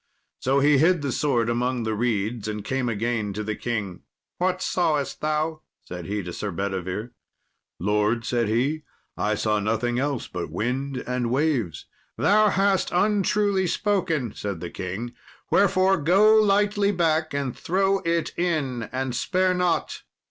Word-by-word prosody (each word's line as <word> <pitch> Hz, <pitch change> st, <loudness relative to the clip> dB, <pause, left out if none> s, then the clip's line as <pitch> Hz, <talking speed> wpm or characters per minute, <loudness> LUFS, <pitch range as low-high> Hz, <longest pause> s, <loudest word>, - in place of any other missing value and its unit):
So 135 Hz, +2 st, +2 dB
he 145 Hz, -1 st, +5 dB
hid 165 Hz, 0 st, +3 dB
the 140 Hz, -, -1 dB
sword 125 Hz, -5 st, +1 dB
among 120 Hz, +1 st, 0 dB
the 110 Hz, 0 st, -1 dB
reeds, 110 Hz, -1 st, -1 dB
and 105 Hz, -1 st, -4 dB
came 135 Hz, -1 st, -1 dB
again 110 Hz, -2 st, -1 dB
to 105 Hz, +2 st, -4 dB
the 110 Hz, +1 st, -2 dB
king. 105 Hz, -7 st, -4 dB, 0.4 s
"What 185 Hz, +1 st, +1 dB
sawest 155 Hz, -7 st, 0 dB
thou?" 155 Hz, +1 st, -1 dB, 0.2 s
said 90 Hz, -1 st, -7 dB
he 105 Hz, 0 st, -2 dB
to 90 Hz, 0 st, -6 dB
Sir 105 Hz, -, -4 dB
Bedivere. 95 Hz, +4 st, -3 dB, 0.7 s
"Lord," 105 Hz, +4 st, +1 dB
said 120 Hz, -2 st, 0 dB
he, 130 Hz, +8 st, 0 dB, 0.3 s
"I 105 Hz, +1 st, 0 dB
saw 105 Hz, 0 st, 0 dB
nothing 115 Hz, +4 st, 0 dB
else 140 Hz, -2 st, -2 dB
but 90 Hz, -3 st, -5 dB
wind 130 Hz, -, -2 dB
and 125 Hz, -1 st, -1 dB
waves." 125 Hz, -, 0 dB, 0.3 s
"Thou 215 Hz, +1 st, +4 dB
hast 195 Hz, 0 st, +2 dB
untruly 200 Hz, 0 st, +2 dB
spoken," 170 Hz, -, 0 dB
said 100 Hz, -4 st, -4 dB
the 85 Hz, +1 st, -6 dB
king; 95 Hz, +6 st, -5 dB, 0.4 s
"wherefore 195 Hz, -1 st, +4 dB
go 190 Hz, +8 st, +5 dB
lightly 205 Hz, -1 st, +3 dB
back 160 Hz, -4 st, +1 dB
and 140 Hz, -3 st, -2 dB
throw 195 Hz, +2 st, +1 dB
it 170 Hz, -1 st, -1 dB
in, 145 Hz, -9 st, -1 dB
and 130 Hz, 0 st, -2 dB
spare 185 Hz, +9 st, +1 dB
not." 180 Hz, -1 st, 0 dB
130 Hz, 150 wpm, -24 LUFS, 110-175 Hz, 0.7 s, he